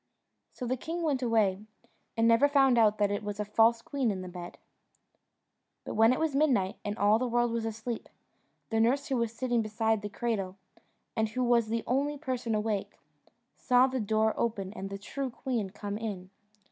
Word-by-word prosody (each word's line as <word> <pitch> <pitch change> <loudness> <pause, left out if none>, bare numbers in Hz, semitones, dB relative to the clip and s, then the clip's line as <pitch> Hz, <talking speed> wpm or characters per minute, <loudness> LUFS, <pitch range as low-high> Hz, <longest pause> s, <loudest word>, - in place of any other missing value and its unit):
So 250 - -6
the 255 +2 -1
king 335 +6 -4
went 285 -5 0
away, 215 -5 +2 0.6
and 225 0 +4
never 230 +5 +5
found 270 -4 +4
out 215 -1 +4
that 205 -1 +2
it 205 - -1
was 205 0 -5
a 210 - -1
false 225 +2 +3
queen 275 -5 -1
in 190 -3 -3
the - - -7
bed. 175 -1 -8 1.3
But - - -5
when 225 +2 +5
it 255 - +1
was 320 -3 0
midnight, 250 -11 +2
and 205 +1 -3
all 210 +1 +4
the 255 - 0
world 240 0 +1
was 230 -1 -2
asleep, 225 +1 -5 0.6
the 225 - +1
nurse 265 +6 +2
who 265 - +1
was 235 -2 0
sitting 240 0 0
beside 220 0 0
the 210 - -5
cradle, 200 -4 -3 0.6
and 220 -1 +1
who 255 +4 -2
was 235 -2 +3
the 230 +1 -2
only 285 +4 0
person 255 -5 -2
awake, 210 -2 -2 0.6
saw 250 0 +4
the 260 0 -2
door 220 0 +1
open 200 -4 -2
and 195 -2 -6
the 195 - -5
true 265 +7 -4
queen 235 -4 -3
come 205 +1 -5
in. 195 -5 -5
225 Hz, 195 wpm, -29 LUFS, 210-250 Hz, 1.3 s, never